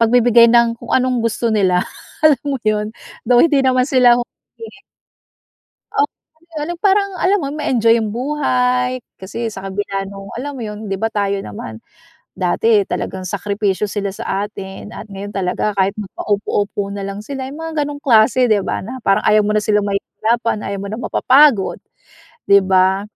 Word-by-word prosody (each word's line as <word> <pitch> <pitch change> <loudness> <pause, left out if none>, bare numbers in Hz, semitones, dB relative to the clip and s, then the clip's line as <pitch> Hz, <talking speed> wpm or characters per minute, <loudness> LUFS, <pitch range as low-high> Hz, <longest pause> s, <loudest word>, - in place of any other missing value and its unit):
pagbibigay 235 0 +5
ng 235 0 +4
kung - - -11
anong 255 -2 +2
gusto 230 0 -1
nila, 185 -3 +2 0.4
alam 295 -5 +5
mo 275 - 0
yun 210 0 0 0.4
though 245 - +5
hindi 300 -4 +3
naman 255 -1 +3
sila 250 -3 +5 1.8
Oh, 430 - +4 0.6
yung 345 +2 -4
parang 400 0 +3
alam 395 +2 +2
mo 275 - -3
ma-enjoy 235 -6 +2
yung 220 -2 -2
buhay 250 -2 0 0.2
kasi 225 +5 -5
sa 195 -2 -8
kabila 195 0 -3
ng 195 0 -9
alam 285 +3 -4
mo 250 - -7
yun, 210 -1 -6
'di 195 - -2
ba, 225 0 0
tayo 200 -2 -1
naman 110 +2 -8 0.5
dati 205 +3 +2
talagang 185 0 -4
sakripisyo 200 +1 -2
sila 200 -1 -3
sa 195 0 -3
atin 200 +1 -9
at 215 - -9
ngayon 200 +1 -7
talaga 195 +2 -1
kahit 195 0 0
maka-upo-upo 205 0 -2
nalang 200 +1 -6
sila, 265 0 -5
yung 280 - -9
mga 320 -2 -3
ganong 290 0 -4
klase, 250 0 +4
'di 215 -3 +3
ba. - - -3
Na 255 +4 -7
parang 195 -4 +1
ayaw 215 0 +5
mo 210 +1 0
na 210 - +2
silang 210 -1 +1
mahihirapan, 220 +3 -1
ayaw 200 - -3
mo 200 - -6
na 225 - -4
mapapagod 265 -6 +3 0.7
'di 200 0 +6
ba. 190 +1 +3
215 Hz, 165 wpm, -18 LUFS, 200-250 Hz, 1.8 s, di